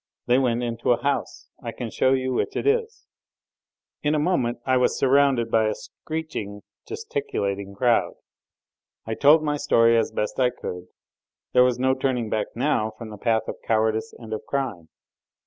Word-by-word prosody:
"They 125 +2 +4
went 125 -2 +1
into 120 0 +1
a 120 - -4
house... 140 0 -2
I - - -5
can - - -6
show 130 - +2
you 130 -1 0
which - - -1
it - - -2
is 450 +1 0 0.5
" - - -68
In 150 +1 +1
a - - +2
moment 145 -7 0
I 130 - +2
was 125 - +2
surrounded 135 -4 +3
by 110 -1 +3
a 110 - -1
screeching, 150 -11 -6 0.2
gesticulating 100 - -3
crowd. 120 +2 +2 0.9
I 110 - -3
told 150 +6 +5
my 150 -1 0
story 115 -4 +4
as 115 - +1
best 105 - -3
I 125 -1 +4
could; 90 -6 -7 0.7
there 125 - +6
was 125 -1 +2
no 130 +1 +2
turning 130 -4 -1
back 110 - 0
now 120 -4 +1
from 110 -1 -8
the 105 - -8
path 115 -1 +1
of - - -5
cowardice 110 +4 0
and 110 -2 -8
of 110 - -3
crime. 120 - -3
125 Hz, 180 wpm, -24 LUFS, 110-140 Hz, 0.9 s, there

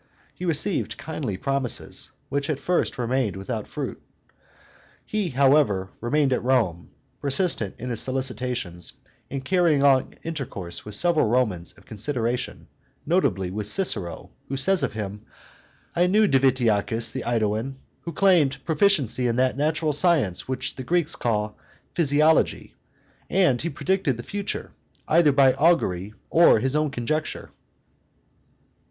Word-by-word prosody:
He 180 - -7
received 165 +3 0
kindly 140 -11 -4
promises, 135 -2 -2 0.2
which 140 +1 -2
at 150 - 0
first 175 +5 0
remained 125 -3 0
without 105 +3 -5
fruit. - - -5 1.0
He, 210 -4 -2
however, 130 -8 +3
remained 135 +3 +2
at - - 0
Rome, 115 -10 +1 0.3
persistent 140 - 0
in 125 +1 -4
his 115 - -1
solicitations, 125 -9 -2 0.4
and 135 -1 -5
carrying 170 -5 +3
on 135 -2 +3
intercourse 130 - -5
with 105 -1 -4
several 170 -1 +2
Romans 105 -8 0
of - - -19
consideration, 120 +2 -3 0.4
notably 95 -1 +1
with 105 +1 -3
Cicero, 105 - 0 0.2
who 135 - -3
says 190 +7 +2
of - - -1
him, 105 -1 -5 0.7
"I 175 +1 +3
knew 210 +3 +4
Divitiacus, 120 - +2
the 130 - -4
AEduan, 115 +2 -1 0.3
who 170 - -6
claimed 170 -8 +3
proficiency 155 - +2
in 115 - 0
that 130 +1 +2
natural 155 +2 0
science 145 - +2
which 130 0 -3
the 130 - -5
Greeks 170 +3 0
call 105 -2 -2 0.3
physiology, 155 0 +2 0.6
and 175 -11 +3
he 170 - -2
predicted 180 -9 0
the 120 - -7
future, 200 +6 -4 0.4
either 160 -2 +5
by 135 -1 +5
augury 110 - +1 0.2
or 170 +1 +6
his 135 +2 -1
own 150 0 +1
conjecture." 145 +4 -3
135 Hz, 135 wpm, -24 LUFS, 115-155 Hz, 1.0 s, or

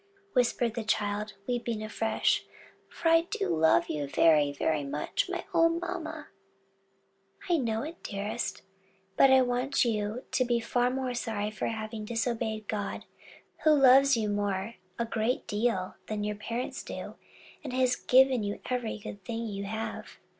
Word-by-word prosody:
whispered 240 -2 +2
the 230 -1 -3
child, 210 0 -1
weeping 235 -3 -2
afresh: 220 +1 +1 0.5
"for 335 - -1
I 330 0 +6
do 415 - -1
love 160 -8 +4
you 145 -2 -3
very, 150 0 +4
very 150 +1 0
much, 145 - -2
my 355 -1 -3
own 330 0 +4
mamma." 320 -3 -5 1.2
"I 350 -2 +3
know 225 -4 -1
it, 330 +3 -8
dearest; 210 +3 -4 0.5
but 275 - +6
I 265 -1 +6
want 250 +2 +1
you 215 +2 -1
to 255 - +2
be 240 -1 +1
far 245 +2 +1
more 260 -1 -2
sorry 215 -3 -2
for 215 - -3
having 220 -1 -4
disobeyed 225 -2 -2
God, 205 -2 -3 0.6
who 310 - +6
loves 270 -1 +6
you 220 -2 0
more, 205 +1 -1 0.2
a 235 - 0
great 230 +2 -1
deal, 205 -3 -1
than 210 -1 -3
your 210 0 -2
parents 230 +4 -4
do, - - -7 0.5
and 275 - -5
has 255 -1 +2
given 260 -1 +4
you 205 0 -3
every 245 -4 -1
good 200 -1 -9
thing 230 +4 -4
you 200 -2 -4
have." 220 +2 -5
230 Hz, 155 wpm, -29 LUFS, 210-255 Hz, 1.2 s, I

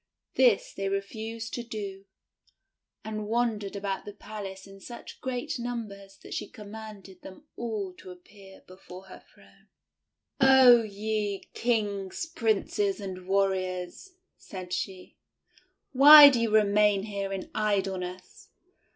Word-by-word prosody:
This 245 -6 +3
they 195 0 -3
refused 220 +3 -5
to 240 - -3
do, 200 -4 -7 1.0
and 215 -1 -5
wandered 220 -3 -1
about 200 -1 -4
the 205 - -9
palace 195 -2 -9
in 195 0 -14
such 240 +4 -11
great 260 +3 -4
numbers 205 -5 -7
that - - -9
she - - -5
com 210 -2 -12
manded 210 -4 -11
them 190 +11 -13
all 215 -5 -4
to - - -12
appear 190 +2 -15
before 185 0 -13
her - - -13
throne. - - -23 0.7
"Oh, 265 -3 +7
ye 210 -1 -3
Kings, 205 - -2
Princes 220 - -1
and 185 -2 -8
Warriors," 190 - -2 0.3
said 185 -2 -8
she, 185 -2 -5 0.7
"why 290 +2 +10
do 245 -4 0
you 230 - +1
remain 210 -1 +3
here 200 -2 -4
in 195 -1 -6
idleness? 190 -3 -3
205 Hz, 125 wpm, -27 LUFS, 195-225 Hz, 1.0 s, why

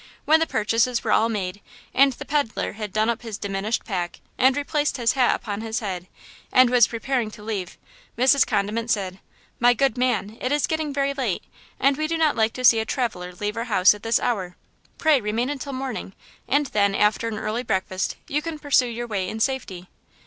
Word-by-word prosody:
When 315 +1 +5
the 325 - +1
purchases 230 +3 +1
were - - -1
all 225 - +3
made 200 -3 -3 0.3
and 275 0 +5
the - - -9
peddler 285 -6 -1
had 210 -2 -6
done 215 +2 +1
up 235 -1 -1
his 225 -4 -6
diminished 200 +3 -2
pack 180 -4 -3 0.2
and 260 +1 +3
replaced 290 +1 0
his 235 -2 +2
hat 255 -3 +3
upon 205 -1 -5
his 225 +1 -2
head 185 -4 -5 0.4
and 255 -1 +5
was 245 -3 +6
preparing 235 0 -2
to 210 -1 -12
leave, 205 -5 -4 0.4
Mrs. 260 +2 +5
Condiment 215 +2 -1
said: 190 -4 -1 0.4
"My 245 +1 +5
good 260 -1 +1
man, 245 -3 0
it 255 - -1
is 290 0 +2
getting 315 -2 -2
very 280 0 0
late, 255 -9 -2 0.4
and 275 0 +3
we 310 0 -1
do 330 +1 -1
not 315 -2 +2
like 220 -1 +1
to 255 - -3
see 230 -2 +7
a - - 0
traveler 220 -8 -3
leave 210 +3 -3
our 230 +1 -3
house 200 -5 +5
at 210 - -11
this 225 +1 +2
hour–pray 240 - -1
remain 225 +5 -1
until 280 0 -5
morning, 255 -7 -5 0.3
and 290 +2 +2
then, 200 -1 +2
after 210 +3 +2
an 220 -2 -3
early 220 +2 -2
breakfast, 190 -4 -2
you 295 +2 -1
can 325 0 -5
pursue 285 -4 +2
your 240 0 -4
way 195 -5 -2
in 220 - -5
safety." 220 -8 -2
230 Hz, 205 wpm, -24 LUFS, 210-265 Hz, 0.4 s, see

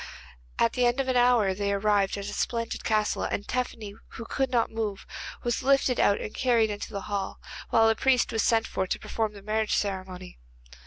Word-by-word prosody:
At 230 - +2
the 250 -1 +3
end 240 +2 0
of 270 - 0
an 260 - +1
hour 245 -5 +4
they 200 +1 -1
arrived 200 -1 +1
at 200 - -5
a 205 - -5
splendid 230 +1 -2
castle, 215 -1 +1
and 205 - -3
Tephany, 230 -5 -3 0.2
who 230 - -7
would 270 -1 +2
not 240 -3 +1
move, 220 -3 -3 0.4
was 240 -1 -1
lifted 270 -2 +2
out 200 - +3
and 210 - -6
carried 235 -4 +2
into 205 +1 -6
the 200 -2 -4
hall, 200 -1 -4 0.3
while 225 0 +5
a 225 - +5
priest 255 +2 +2
was 225 -2 0
sent 225 +1 +2
for 190 - -2
to - - -1
perform 220 -2 -3
the 200 -1 -12
marriage 215 +1 0
ceremony. 185 - -4
220 Hz, 205 wpm, -27 LUFS, 200-240 Hz, 0.4 s, while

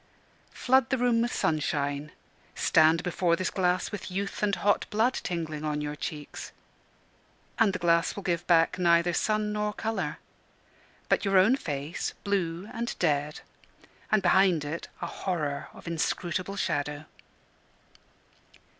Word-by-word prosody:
Flood 260 -1 +3
the 260 - +1
room 240 -2 +2
with 240 +1 0
sunshine; 145 -1 -1 0.4
stand 160 +2 +4
before 175 -1 +1
this 185 +2 -2
glass 180 -1 0
with 205 -3 -6
youth 195 +2 -3
and 205 -2 +2
hot 205 0 +1
blood 225 +5 +2
tingling 160 -7 -4
on 150 -1 -1
your 150 0 -3
cheeks; 150 -1 -6 1.1
and 225 -3 +5
the 185 - -3
glass 170 -1 +2
will 200 - -6
give 175 -1 -1
back 170 +1 +4
neither 170 0 +4
sun 215 +2 0
nor 210 0 -1
colour; 225 +1 -3 0.9
but - - +2
your 195 -1 +3
own 200 +8 +6
face, 145 - -4
blue 185 -2 -1
and 235 +1 -3
dead, 150 -2 0 0.7
and 215 -2 +3
behind 180 -4 +4
it 155 +3 -5 0.2
a - - 0
horror 150 -7 -3
of - - -14
inscrutable 175 +3 -2
shadow. 145 -4 -2
175 Hz, 135 wpm, -28 LUFS, 155-200 Hz, 1.1 s, own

